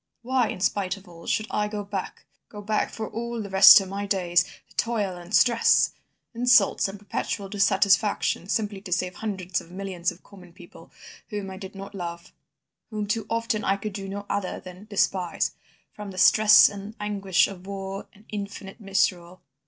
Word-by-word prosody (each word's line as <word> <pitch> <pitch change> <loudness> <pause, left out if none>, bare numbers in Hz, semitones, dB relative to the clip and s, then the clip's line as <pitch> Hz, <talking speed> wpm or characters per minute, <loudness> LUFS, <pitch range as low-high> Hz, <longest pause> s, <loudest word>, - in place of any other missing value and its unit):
Why, 255 -1 +1
in 185 - -6
spite 195 -1 0
of 195 - -17
all, 170 -1 -13
should 215 - 0
I 210 0 0
go 210 -1 -4
back, 200 -2 -6 0.2
go 210 - -10
back 215 +1 0
for 220 -1 -5
all 235 +1 -5
the 200 -3 -6
rest 195 +1 +10
of 195 - -5
my 200 +1 -4
days 175 -3 +2 0.3
to - - -23
toil 210 -5 -1
and 175 +1 -11
stress, 235 +1 +4 0.4
insults 235 -5 +4
and 195 +1 -7
perpetual 200 -1 -4
dissatisfaction, 200 -1 +2
simply 205 -3 -1
to 190 -2 -10
save 180 +1 0
hundreds 190 -5 -3
of 165 - -16
millions 185 -1 -3
of - - -16
common 180 -4 -16
people, 175 -1 -15 0.4
whom 205 -3 -5
I 190 - -8
did 195 0 -9
not 195 +1 -9
love, 170 -3 -7 0.6
whom 215 -2 -3
too 210 +1 -2
often 230 -2 -1
I 195 0 +1
could 210 +1 -6
do 195 -1 -6
no 200 +1 -6
other 200 -2 -3
than 185 +2 -12
despise, 190 -4 0 0.4
from 210 -1 -8
the 185 - -10
stress 215 +3 +7
and 205 +2 -8
anguish 195 -3 +1
of 190 -1 -10
war 195 0 -6
and 210 +2 -21
infinite 200 0 -7
misrule? 185 -3 -1
200 Hz, 185 wpm, -25 LUFS, 190-210 Hz, 0.6 s, rest